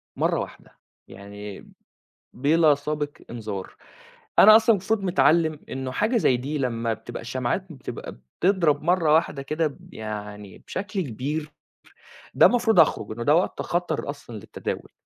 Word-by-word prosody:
مَرّة - - +1
واحدة، - - -9 0.3
يعني 100 0 -10 0.6
بلا 150 +3 +4
سابق 145 +1 -3 0.2
إنذار، 105 -5 -6 0.6
أنا 215 +1 +10
أصلًا 225 0 +5
مفروض 200 +2 -1
متعلّم 155 -1 +3
إنه 130 -1 -4
حاجة 220 - +1
زي 130 - +3
دي 140 +5 -3
لمّا 115 -4 -1
بتبقى - - -8
الشمعات 125 +9 -2
بتبقى 135 - -7 0.3
بتضرب 175 -6 +2
مَرّة 170 -2 +3
واحدة 155 -3 +2
كده 155 +3 -1
ب 145 - -13
يعني 105 -2 -7
بشكل 195 +1 -3
كبير، 150 +3 -4 0.8
ده - - +7
مفروض 225 -5 +2
أخرُج، 130 -9 +3
إنه 120 +2 -4
ده 145 +5 +4
وقت 175 - 0
خطر 175 -4 -2
أصلًا 145 -5 -8
للتداول. 105 - -6
145 Hz, 140 wpm, -24 LUFS, 120-175 Hz, 0.8 s, أنا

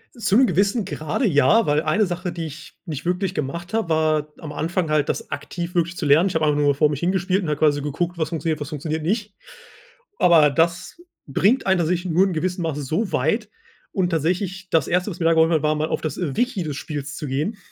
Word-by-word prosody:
Zum 235 +2 +3
gewissen 200 +2 +1
Grade, 155 - -2
ja, 180 - +4
weil 150 +1 +2
eine 200 +7 +2
Sache, 180 0 -4
die 165 -1 -5
ich 155 0 -10
nicht 155 -5 -5
wirklich 180 +2 -1
gemacht 170 +5 -4
habe, 225 -6 0
war 155 -1 +1
am 155 - -8
Anfang 165 +2 -2
halt 150 -2 +1
das - - -3
aktiv 170 +4 -5
wirklich 175 0 0
zu 160 - -3
lernen. 155 +7 +5
Ich - - -6
habe 160 -1 +2
einfach 150 -1 +2
nur 145 -1 +3
vor 150 +2 +3
mich 145 - -3
hin 175 +4 +1
gespielt 190 +1 0
und 170 - -3
habe 150 - 0
quasi 145 -1 +2
geguckt: 170 +4 -3
„Was 160 - 0
funktioniert, 160 -2 -2
was 145 - -4
funktioniert 155 +1 -3
nicht.“ 205 +5 -2 0.9
Aber 165 -4 +6
das 170 - -1 0.2
bringt 205 - +2
einen 190 0 +3
tatsächlich 175 +1 -1
nur 180 +4 +4
in 190 - -1
gewissen 180 +2 -2
Masse 150 -3 -2
so 165 - -2
weit. 205 - 0 0.4
Und 185 -2 +1
tatsächlich 185 +3 -2
das 165 - +2
1., 180 +4 0
was 175 - -9
mir 165 - -1
da 165 - +5
geholfen 160 0 +4
hat, 155 - +1
war 155 0 +2
mal 155 +1 -1
auf - - -1
das, 155 - -4
äh, 155 -7 -3
Wiki 245 -7 0
des 150 -3 -4
Spiels 145 -2 -5
zu 150 - -5
gehen, 150 - -2
165 Hz, 235 wpm, -22 LUFS, 150-185 Hz, 0.9 s, Aber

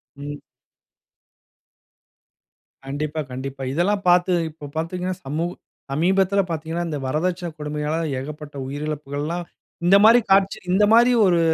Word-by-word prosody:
ம். 145 +1 -7 2.4
கண்டிப்பா, 150 +3 -3
கண்டிப்பா. 135 +1 -6
இதெல்லாம் 195 +5 +1
பார்த்து 175 +1 +4 0.2
இப்போ 150 -1 -11
பார்த்தீங்கன்னா, 180 +3 -2
சமூ 150 +5 -1 0.5
சமீபத்தில 190 +6 +2
பார்த்தீங்கன்னா, 165 +1 -3
இந்த 150 - -2
வரதட்சணை 175 +5 -1
கொடுமையால 150 +1 -2 0.2
ஏகப்பட்ட 150 +2 -8
உயிரிழப்புகள்லாம் 150 +3 -4 0.4
இந்தமாரி 210 +6 +7
காட்சி 195 0 +4
இந்த 195 +3 +4
மாரி 235 +2 +6
ஒரு 175 -3 +3
160 Hz, 105 wpm, -22 LUFS, 150-185 Hz, 2.4 s, இந்தமாரி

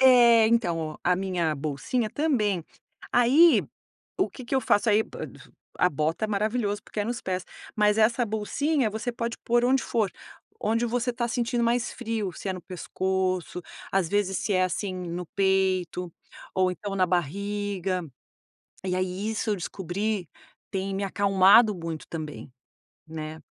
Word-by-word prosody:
É, 240 -4 +7
então, 220 -8 +2
ó, 155 -1 -4
a 180 - +3
minha 180 -4 0
bolsinha 155 - -2
também. 215 - +1 0.5
Aí, 275 +8 +6 0.5
o 380 - +1
que 255 - -10
que 255 - -3
eu 265 - +3
faço? 215 0 +2
Aí, 210 +1 +4
pa - - -7
du - - -12 0.4
a 180 - +3
bota 155 +8 -1
é - - -1
maravilhoso, 210 0 0
porque 210 - -4
é - - 0
nos 235 +2 -3
pés, 185 -1 -3 0.3
mas 210 0 +3
essa 235 +3 +3
bolsinha 235 +6 0
você 220 +3 -3
pode 235 0 -3
pôr 240 +1 +2
onde 265 +2 +3
for, 220 -4 0 0.5
onde 230 +3 +1
você 245 +1 0
tá 235 0 -1
sentindo 235 0 0
mais 240 +1 +1
frio, 225 -5 -3
se 195 - -6
é - - +1
no 185 -2 -7
pescoço, 185 -1 -2 0.3
às 190 -4 +1
vezes 195 -2 +1
se 210 - -1
é, 185 -1 +3
assim, 185 +1 -1
no 180 -1 -5
peito 185 -3 +1 0.4
ou 185 -1 +3
então 195 +2 -5
na 185 -1 +3
barriga. 190 +2 -1 0.8
E 180 -1 0
aí 185 +3 -2
isso 220 0 -1
eu 205 - +1
descobri, 190 +2 -3 0.4
tem 195 -1 -2
me 195 - -2
acalmado 200 +2 +5
muito 165 -2 -6
também, 155 -4 -6 0.6
né? 155 0 -7
200 Hz, 165 wpm, -26 LUFS, 180-230 Hz, 0.8 s, É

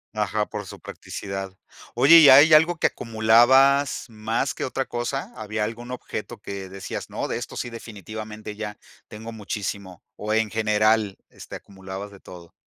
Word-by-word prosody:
Ajá, 105 0 -1
por 105 -1 -6
su - - -11
practicidad. 95 -1 -7 0.4
Oye, 135 +8 +7
¿y 155 -4 +9
hay 145 +4 +8
algo 165 +3 +4
que - - +4
acumulabas 120 +6 +3
más 110 +1 -2
que - - -3
otra 135 +1 -3
cosa? 120 +3 -4
¿Había 110 -2 -3
algún 115 +3 -6
objeto 125 - -6
que 100 -1 -7
decías: 95 0 -7
"No, - - -3
de - - -3
esto - - -7
sí, - - -4
definitivamente 110 -1 -8
ya 105 -1 -6 0.3
tengo 110 +2 -9
muchísimo", 100 -3 -6
o 105 +1 -3
en 110 -1 +1
general, 110 -1 +1
este - - -11
acumulabas 95 +1 -9
de 100 -1 -15
todo? 85 -3 -13
110 Hz, 160 wpm, -24 LUFS, 100-120 Hz, 0.4 s, y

